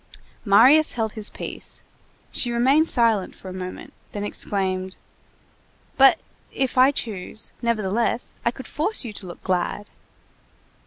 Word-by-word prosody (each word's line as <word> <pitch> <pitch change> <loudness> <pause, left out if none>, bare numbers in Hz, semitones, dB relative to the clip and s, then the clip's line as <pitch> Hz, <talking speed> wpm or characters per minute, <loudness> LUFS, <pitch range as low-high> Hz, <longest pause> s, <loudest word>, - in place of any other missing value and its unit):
Marius 255 +10 +6
held 220 -2 -2
his 215 -2 -2
peace; - - -7 0.5
she 240 - -1
remained 270 +7 +3
silent 225 -5 +2
for 190 - -10
a - - -7
moment, 185 0 -7 0.2
then 205 - -4
exclaimed:— 190 -2 -2 1.0
"But 270 0 +7 0.3
if 265 -2 -1
I 255 +1 +6
choose, 220 -6 -5
nevertheless, 230 0 0
I - - +3
could 260 +2 -8
force 320 - -1
you 220 - -6
to 195 -2 -8
look 175 - -10
glad!" 185 +3 -2
225 Hz, 135 wpm, -23 LUFS, 195-255 Hz, 1.0 s, But